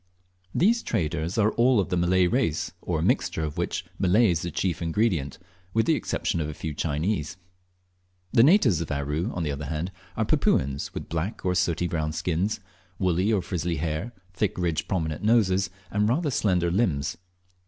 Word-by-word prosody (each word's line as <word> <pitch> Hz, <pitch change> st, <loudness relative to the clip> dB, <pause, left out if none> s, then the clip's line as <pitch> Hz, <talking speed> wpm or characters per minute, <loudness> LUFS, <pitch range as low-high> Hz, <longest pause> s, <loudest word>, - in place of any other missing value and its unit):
These 230 Hz, +6 st, +3 dB
traders 85 Hz, -, -2 dB
are 110 Hz, 0 st, +3 dB
all 120 Hz, 0 st, +3 dB
of 95 Hz, -, 0 dB
the -, -, 0 dB
Malay 90 Hz, +1 st, +3 dB
race, 90 Hz, -, 0 dB
or -, -, -1 dB
a -, -, -1 dB
mixture 80 Hz, -, +1 dB
of 75 Hz, -1 st, -3 dB
which 85 Hz, -, -2 dB
Malay 95 Hz, +3 st, +4 dB
is 85 Hz, -1 st, 0 dB
the 85 Hz, -, -4 dB
chef 90 Hz, +1 st, -1 dB
ingredient, 85 Hz, -5 st, 0 dB, 0.4 s
with 115 Hz, -, +3 dB
the 165 Hz, -, +3 dB
exception 85 Hz, -, -1 dB
of 75 Hz, -, -2 dB
a 75 Hz, -, -6 dB
few 80 Hz, +1 st, -4 dB
Chinese. 80 Hz, +2 st, -1 dB, 1.0 s
The 115 Hz, -, +6 dB
natives 130 Hz, -, +5 dB
of 80 Hz, -, -4 dB
Aru, 75 Hz, +7 st, -1 dB
on 90 Hz, -, -3 dB
the 75 Hz, -, -1 dB
other 70 Hz, +1 st, -4 dB
hand, 80 Hz, +5 st, -3 dB, 0.3 s
are, -, -, +1 dB
Papuans, 70 Hz, +1 st, +1 dB
with -, -, -5 dB
black 85 Hz, +7 st, -3 dB
or 90 Hz, -, +2 dB
sooty 90 Hz, -2 st, +1 dB
brown 80 Hz, -3 st, -2 dB
skims, 90 Hz, +6 st, -1 dB, 0.4 s
woolly 95 Hz, +3 st, +1 dB
or 100 Hz, -5 st, +1 dB
frizzly 85 Hz, -2 st, -2 dB
hair, 80 Hz, +8 st, -2 dB, 0.2 s
thick 100 Hz, +2 st, -1 dB
ridged 85 Hz, -3 st, -1 dB
prominent 80 Hz, -5 st, -2 dB
noses, 100 Hz, -4 st, +3 dB, 0.2 s
and 105 Hz, +1 st, +2 dB
rather 150 Hz, +4 st, +1 dB
slender 90 Hz, -7 st, +1 dB
limbs. 85 Hz, -9 st, 0 dB
90 Hz, 180 wpm, -26 LUFS, 80-105 Hz, 1.0 s, The